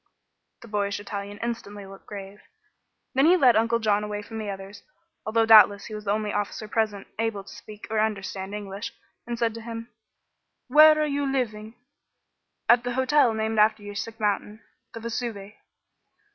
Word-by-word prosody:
The - - -11
boyish 205 -2 -1
Italian 205 0 -6
instantly 205 -4 -5
looked 195 0 -13
grave. 200 0 -9 0.7
Then 270 +3 +4
he 360 +2 +6
led 255 -7 +5
Uncle 230 +1 +2
John 210 -2 +1
away 210 0 -4
from 220 +2 -7
the 215 -2 -4
others, 195 +1 -8 0.5
although 225 +1 +2
doubtless 210 -2 +7
he 215 - -8
was 210 0 -7
the 200 - 0
only 210 0 -1
officer 205 +1 -3
present 210 -2 -1
able 225 -3 -1
to 195 - -12
speak 210 -1 -11
or 220 - +1
understand 200 -2 -2
English, 205 +2 -6 0.3
and 240 0 -3
said 230 -1 0
to 230 - -8
him: 230 +1 -7 0.8
"Where 310 +1 +7
are 305 - +2
you 285 -2 -1
living?" 220 -4 -3 0.9
"At 240 0 +5
the 245 0 -2
hotel 260 -2 +3
named 220 0 -1
after 215 0 +3
your 205 0 -7
sick 225 +2 -6
mountain 210 +1 -1 0.3
the - - -5
Vesuve." 225 -3 -5
215 Hz, 170 wpm, -25 LUFS, 205-230 Hz, 0.9 s, doubtless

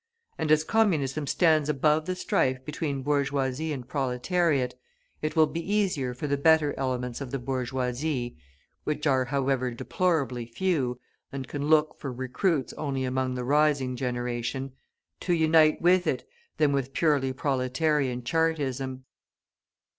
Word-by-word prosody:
And 155 - 0
as 155 0 +5
Communism 155 -9 +1
stands 155 -3 +3
above 150 +2 +2
the 185 - -1
strife 130 -7 0
between 145 -3 -3
bourgeoisie 140 +1 0
and 130 -4 -5
proletariat, 135 +1 0 0.5
it 155 - -2
will 160 -1 +6
be 165 - -4
easier 180 -10 0
for 125 - -5
the 140 -1 0
better 155 -1 +4
elements 125 -1 -3
of 135 - -5
the 135 - -2
bourgeoisie 125 +1 -2 0.5
(which 150 0 -2
are, 130 -3 +3
however, 135 -1 0
deplorably 130 -2 -1
few, 130 -3 -1 0.3
and 135 -2 -5
can 145 +2 -3
look 155 0 +3
for 140 - -4
recruits 130 +4 -1
only 135 -3 -2
among 130 0 -1
the 125 - -3
rising 145 -2 +2
generation) 125 +1 -3 0.5
to 180 - 0
unite 160 -1 +4
with 180 +1 +4
it - - -1 0.3
than 150 -2 +3
with 135 -1 -1
purely 145 -5 +2
proletarian 130 0 0
Chartism. 135 -4 -1
140 Hz, 140 wpm, -27 LUFS, 130-155 Hz, 0.5 s, will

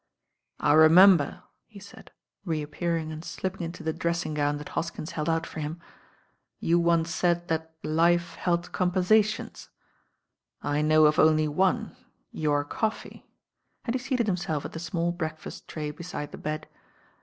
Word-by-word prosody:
^ - - -54 0.6
I 145 - +3
remember," 170 +2 +6 0.2
he 215 - -15
said, 200 - -14 0.3
reappearing 160 0 -2
and 155 +1 -7
slipping 190 +1 -5
into 170 +1 -6
the 160 - -1
dressing 170 -1 -2
gown 145 0 0
that 150 - -8
Hoskins 165 -1 -4
held 155 +1 -2
out 165 0 0
for - - -8
him, 155 +3 -4 0.8
"you 170 +1 +2
once 170 -1 +2
said 175 +1 0
that 160 0 -2
life 170 +2 +2
held 170 -1 -1
compensations. 195 +4 +1 0.9
I 145 +1 -1
know 155 0 +5
of 150 +1 +3
only 155 0 +4
one, 185 +6 0 0.4
your 145 -2 0
coffee," 220 +8 -4 0.6
and 230 - -1
he 260 - 0
seated 250 -3 -1
him 185 -3 +1
self 160 -5 -3
at - - -6
the 160 - -6
small 170 +1 -1
breakfast 160 -3 -6
tray 150 -2 -4
beside 150 -2 -7
the - - -9
bed. 155 0 -4
165 Hz, 155 wpm, -27 LUFS, 155-180 Hz, 0.9 s, remember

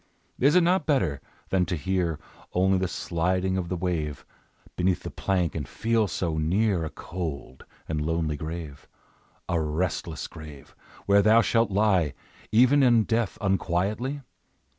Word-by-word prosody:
Is 140 +5 +4
it 180 - +6
not 180 -1 +2
better, 90 - +1 0.3
than 95 -1 +2
to 90 - -1
hear 85 -1 -1 0.4
Only 95 +1 +3
the 95 - 0
sliding 90 +2 -1
of 90 -2 -2
the 90 - -1
wave 85 -5 -3 0.5
Beneath 90 0 0
the - - -6
plank, 90 -5 0
and 75 -5 -4
feel 115 -1 0
so 80 -2 -2
near 90 +3 +1
A 80 - -3
cold 75 -9 -6 0.2
and 75 -2 -2
lonely 80 0 -1
grave, 80 -1 -7 0.6
A 85 -2 0
restless 80 0 -2
grave, 75 -3 -11 0.3
where 100 0 +5
thou 110 +3 +6
shalt 115 -1 +2
lie 95 -7 +2 0.4
Even 130 +6 +5
in 120 -4 +5
death 115 -1 -1
unquietly? 100 +8 -1
90 Hz, 145 wpm, -26 LUFS, 80-105 Hz, 0.6 s, it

